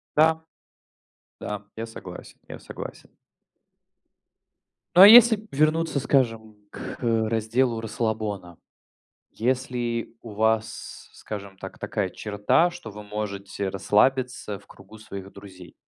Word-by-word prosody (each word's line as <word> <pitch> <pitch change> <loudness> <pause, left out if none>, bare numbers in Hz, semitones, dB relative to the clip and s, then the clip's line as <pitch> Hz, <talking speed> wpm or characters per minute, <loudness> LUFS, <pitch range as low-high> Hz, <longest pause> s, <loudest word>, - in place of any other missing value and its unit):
Да. 160 +1 +4 1.0
Да, 105 -1 -5
я 115 +1 -4
согласен. 115 - -11
Я - - -8
согласен. - - -9 1.9
Ну, 180 - +8
а 200 - +12
если 220 -1 +8
вернуться, 155 +1 +1
скажем, 115 -6 0
к - - -8
разделу 115 +1 0
расслабона, 110 -5 -3 0.7
если 120 -1 -2
у 115 - -10
вас, 110 +1 -2
скажем 100 -2 -8
так, 95 - -10
такая 100 -4 -2
черта, 105 - +1
что 175 -11 -10
вы 105 +1 -10
можете 100 -2 -4
расслабиться 105 +1 +1
в - - -23
кругу 100 +3 -15
своих 100 -2 -9
друзей? 95 -3 -13
110 Hz, 110 wpm, -25 LUFS, 105-130 Hz, 1.9 s, а